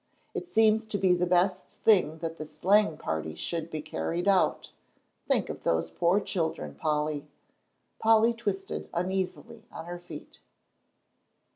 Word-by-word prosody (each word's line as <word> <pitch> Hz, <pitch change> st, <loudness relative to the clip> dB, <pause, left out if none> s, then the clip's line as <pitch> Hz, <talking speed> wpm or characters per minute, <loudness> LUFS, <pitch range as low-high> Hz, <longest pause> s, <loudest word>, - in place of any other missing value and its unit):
It -, -, -4 dB
seems 220 Hz, -3 st, +3 dB
to 215 Hz, -, -2 dB
be 190 Hz, -2 st, +4 dB
the 180 Hz, 0 st, +1 dB
best 180 Hz, +1 st, +2 dB
thing 185 Hz, -7 st, +3 dB
that 165 Hz, 0 st, -4 dB
this 155 Hz, 0 st, -8 dB
sleighing 195 Hz, -1 st, +3 dB
party 80 Hz, 0 st, -3 dB
should 165 Hz, -1 st, -3 dB
be 155 Hz, -2 st, -5 dB
carried 165 Hz, -, -3 dB
out. 195 Hz, -2 st, +2 dB, 0.6 s
Think -, -, +2 dB
of -, -, -6 dB
those 80 Hz, 0 st, 0 dB
poor 170 Hz, -, +2 dB
children, 165 Hz, -5 st, -3 dB
Polly." 150 Hz, -1 st, -1 dB, 0.7 s
Polly 225 Hz, +1 st, +5 dB
twisted 200 Hz, -4 st, -4 dB
uneasily 180 Hz, -3 st, -2 dB
on -, -, -8 dB
her 175 Hz, 0 st, -6 dB
feet. 175 Hz, -, -11 dB
175 Hz, 140 wpm, -28 LUFS, 155-200 Hz, 0.7 s, Polly